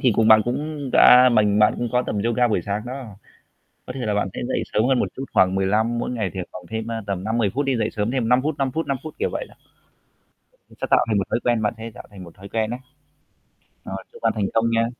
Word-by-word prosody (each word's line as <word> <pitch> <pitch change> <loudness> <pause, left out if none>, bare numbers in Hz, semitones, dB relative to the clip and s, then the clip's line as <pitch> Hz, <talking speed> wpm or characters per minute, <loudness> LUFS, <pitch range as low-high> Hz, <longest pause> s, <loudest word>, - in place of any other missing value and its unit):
thì 125 -4 +3
cùng 110 0 +3
bạn 110 0 +8
cũng 145 +2 -3
đã 125 +1 +8
mình 105 -2 +3
bạn 105 0 +4
cũng 120 -1 -1
có 125 0 +2
tập - - -2
yoga 120 +1 +2
buổi 95 -5 0
sáng 100 +1 -3
đó. 125 -6 -7 0.7
Có - - -5
thể 130 - -7
là 105 - 0
bạn 105 -2 0
sẽ - - -5
dậy - - -1
sớm 110 - +2
hơn 130 - +3
một - - 0
chút 135 - -4
khoảng 95 0 +3
15, 105 +5 +1
mỗi 120 - -2
ngày 110 -7 -2
thì 95 - -3
khoảng 90 -1 -9
thêm, 110 0 -3
ơ, 115 - -4
tầm 95 -1 -3
5,10 110 -2 0
phút 140 +4 -1
đi, 135 - +1
dậy 110 -1 0
sớm 105 +1 -2
thêm 125 -3 -1
5 125 +1 +4
phút, 155 +2 -1
5 135 -1 0
phút, 160 0 -2
5 140 - -1
phút, 155 - -8
kiểu - - 0
vậy - - -4
đó. - - -18 1.1
Nó - - -18
sẽ - - -1
tạo - - +5
thành 105 - +2
một 95 - 0
thói - - 0
quen. 120 -2 +1
Bạn 105 +2 0
sẽ 115 +1 -7
tạo - - -11
thành 95 -3 -11
một 85 - -14
thói 100 +1 -12
quen 110 +1 -1
á. 120 - -4 1.1
Rồi, - - -6
chúc 470 - -15
bạn - - +2
thành 100 - 0
công 115 +1 +2
nha. 115 0 +2
115 Hz, 275 wpm, -22 LUFS, 105-125 Hz, 1.1 s, bạn